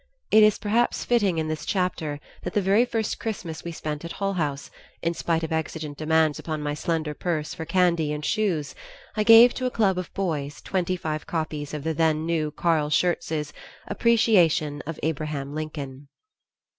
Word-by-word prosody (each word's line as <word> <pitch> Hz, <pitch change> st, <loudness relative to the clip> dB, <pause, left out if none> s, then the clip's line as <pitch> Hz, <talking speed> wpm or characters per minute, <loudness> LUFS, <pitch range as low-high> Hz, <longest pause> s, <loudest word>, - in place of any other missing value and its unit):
It 215 Hz, -, +7 dB
is 215 Hz, 0 st, +5 dB
perhaps 230 Hz, +3 st, 0 dB
fitting 205 Hz, -8 st, +2 dB
in 160 Hz, -1 st, -1 dB
this 155 Hz, 0 st, -3 dB
chapter 170 Hz, -6 st, -1 dB, 0.2 s
that -, -, -5 dB
the -, -, +4 dB
very 200 Hz, +6 st, +4 dB
first 225 Hz, -3 st, -2 dB
Christmas 185 Hz, -8 st, -5 dB
we 170 Hz, -, -5 dB
spent 150 Hz, -2 st, -5 dB
at 170 Hz, 0 st, -6 dB
Hull 195 Hz, -1 st, -1 dB
House, 145 Hz, -6 st, -3 dB, 0.3 s
in 170 Hz, 0 st, +1 dB
spite 165 Hz, -1 st, -1 dB
of 160 Hz, -, -3 dB
exigent 160 Hz, -2 st, -3 dB
demands 155 Hz, 0 st, +2 dB
upon 155 Hz, -2 st, -4 dB
my 145 Hz, 0 st, -1 dB
slender 155 Hz, 0 st, -2 dB
purse 155 Hz, -1 st, -2 dB
for 160 Hz, -, -6 dB
candy 170 Hz, -4 st, +2 dB
and 150 Hz, 0 st, -4 dB
shoes, 175 Hz, -9 st, 0 dB, 0.4 s
I 215 Hz, -, +1 dB
gave 230 Hz, +3 st, +8 dB
to 255 Hz, -, -2 dB
a -, -, 0 dB
club 195 Hz, -6 st, +1 dB
of 180 Hz, -, -6 dB
boys 150 Hz, -7 st, -2 dB
twenty 185 Hz, -1 st, -1 dB
five 155 Hz, -4 st, -4 dB
copies 155 Hz, -3 st, -3 dB
of 150 Hz, -2 st, -5 dB
the 160 Hz, +1 st, -1 dB
then 160 Hz, 0 st, +1 dB
new 160 Hz, -2 st, 0 dB
Carl 155 Hz, -1 st, +1 dB
Schurz's 160 Hz, -2 st, 0 dB, 0.3 s
"Appreciation 195 Hz, -10 st, +3 dB
of 165 Hz, -2 st, -5 dB
Abraham 150 Hz, -3 st, -2 dB
Lincoln." 145 Hz, -3 st, -6 dB
160 Hz, 180 wpm, -25 LUFS, 150-190 Hz, 0.4 s, gave